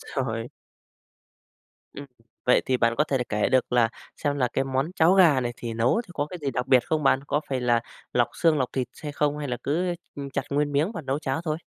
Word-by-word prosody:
Rồi. 115 -3 -2 1.5
Ừm, 140 0 -8 0.4
vậy 125 - +5
thì 130 - +2
bạn 115 -1 +2
có 150 - +3
thể 135 -3 0
được 125 - -1
kể 105 0 +1
được 130 -1 +1
là 120 -2 +4 0.3
xem 145 -1 -1
là 125 -3 +1
cái 135 - 0
món 135 +4 -1
cháo 165 +1 +5
gà 165 -9 +6
này 120 -1 -2
thì 115 -2 -5
nấu 120 - +2
thì - - -16
có 145 - -1
cái 180 - -6
gì 140 - 0
đặc 125 0 -2
biệt 130 -2 +4
không 155 -1 -1
bạn? 135 0 +3
Có 150 - 0
phải 130 -2 -1
là 120 -1 +2 0.3
lọc - - +2
xương, 160 -2 +3
lọc 130 -2 -1
thịt 130 -3 -2
xay 150 -2 -7
không? 145 0 0
Hay 145 -2 -4
là 125 - -1
cứ, 175 +5 0 0.2
ưm, 140 -1 -6
chặt 135 0 -1
nguyên 145 +1 0
miếng 155 +9 +1
và 175 - -5
nấu 135 +1 -1
cháo 135 +1 -2
thôi? 155 -2 -1
135 Hz, 245 wpm, -25 LUFS, 125-150 Hz, 1.5 s, gà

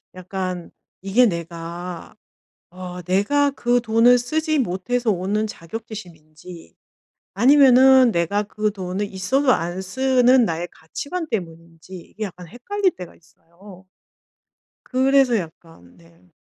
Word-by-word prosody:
약간 185 -1 -5 0.3
이게 195 +6 +3
내가 170 -1 -6 0.5
어 180 0 -8
내가 240 - +1
그 245 -2 0
돈을 230 +2 +4
쓰지 310 +5 -1
못해서 235 +3 -1
오는 200 +3 -1
자격지심인지 170 - -11 0.6
아니면은 260 +1 +6
내가 200 +3 0
그 210 +1 -2
돈이 190 +1 -4
있어도 255 +8 0
안 175 +3 -3
쓰는 255 +3 +3
나의 170 0 -3
가치관 310 - -6
때문인지 165 -2 -7
이게 210 +5 -9
약간 180 -3 -8
헷갈릴 370 - -1
때가 180 -2 -10
있어요. 180 +3 -18 1.0
그래서 265 -2 +2
약간 160 - -10
네. 85 +1 -23
195 Hz, 245 characters per minute, -21 LUFS, 170-245 Hz, 1.0 s, 아니면은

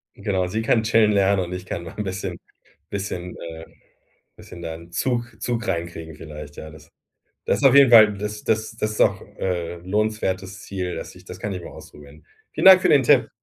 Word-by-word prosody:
Genau, 95 -3 -1
sie 110 +5 -2
kann 115 0 +2
chillen 110 -1 +4
lernen 100 -1 +2
und 90 - -7
ich 90 +1 -6
kann 85 - -5
mal 85 - -9
'n 105 - -2
bisschen 95 -2 -5 0.5
bisschen, 90 -3 -5
äh 80 -1 -8 0.7
bisschen 85 - -12
da 80 -1 -5
'n 85 +1 -13
Zug 120 +4 -2
Zug 120 -2 -2
reinkriegen 85 -3 -4
vielleicht. 75 -2 -10
Ja, 80 - -9
das 75 +1 -16 0.5
das - - +1
ist 140 - -3
auf 135 - +6
jeden 140 -3 +7
Fall 110 -3 +8
das 105 +1 -5
das 110 0 0
das 110 - -1
ist - - -6
auch, 100 -1 +3 0.2
äh, 85 -2 -2
'n 85 - -15
lohnenswertes 95 -2 -2
Ziel, 90 -2 -4
das - - -7
ich - - -16
das 90 0 -10
kann 100 +1 -4
ich 90 -2 -6
mal - - -9
ausprobieren. 75 +1 -14 0.3
Vielen - - -3
Dank 185 -1 +10
für - - +3
den 140 - +5
Tipp. - - +4
95 Hz, 215 wpm, -23 LUFS, 85-110 Hz, 0.7 s, Dank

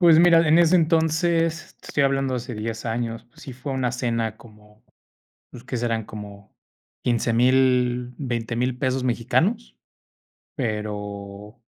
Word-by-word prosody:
Pues 165 -3 +7
mira, 165 -1 +6
en 160 +2 +6
ese 175 +1 +5
entonces, 165 0 +1
te - - -15
estoy 140 - +1
hablando 135 -1 +1
hace 125 0 -5
10 110 +2 -5
años, 115 0 -3
pues, 120 - -18
sí 130 - -8
fue 130 +3 -6
una 130 -2 -1
cena 115 -3 -2
como, 105 -2 -19 0.7
pues, 120 - -11
¿qué 135 - -4
serán? 115 -2 -1
Como 100 -2 -10 0.5
$15,000, 125 +1 +2
$20,000 120 -1 -2
pesos 130 -1 -1
mexicanos, 160 - 0 0.8
pero, 105 -2 -5
125 Hz, 135 wpm, -23 LUFS, 115-140 Hz, 0.8 s, Pues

